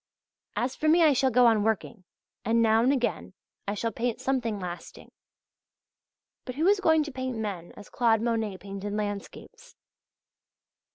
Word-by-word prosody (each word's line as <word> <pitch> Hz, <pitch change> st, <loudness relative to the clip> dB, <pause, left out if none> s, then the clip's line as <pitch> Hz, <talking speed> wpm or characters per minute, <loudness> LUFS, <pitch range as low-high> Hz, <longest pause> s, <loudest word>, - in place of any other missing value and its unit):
As 250 Hz, +2 st, -1 dB
for 310 Hz, -, -2 dB
me, 335 Hz, +2 st, +5 dB
I 305 Hz, -3 st, +6 dB
shall 265 Hz, 0 st, +2 dB
go 250 Hz, 0 st, +4 dB
on 225 Hz, -3 st, +4 dB
working, 220 Hz, -2 st, -2 dB, 0.4 s
and 230 Hz, +2 st, +2 dB
now 225 Hz, -1 st, +4 dB
and 250 Hz, +3 st, +3 dB
again 250 Hz, -4 st, -2 dB, 0.3 s
I 205 Hz, -, -1 dB
shall 230 Hz, +2 st, -2 dB
paint 240 Hz, +2 st, -2 dB
something 250 Hz, -5 st, -1 dB
lasting. 180 Hz, -1 st, -8 dB, 1.3 s
But 255 Hz, -, -7 dB
who 310 Hz, +4 st, 0 dB
is 400 Hz, +1 st, +4 dB
going 320 Hz, -4 st, +3 dB
to 295 Hz, -, -7 dB
paint 260 Hz, -2 st, -4 dB
men 195 Hz, -6 st, -5 dB
as 205 Hz, -, -11 dB
Claude 230 Hz, -2 st, +2 dB
Monet 225 Hz, -4 st, -1 dB
painted 200 Hz, +1 st, -6 dB
landscapes? 210 Hz, -, -6 dB
230 Hz, 160 wpm, -27 LUFS, 210-260 Hz, 1.3 s, I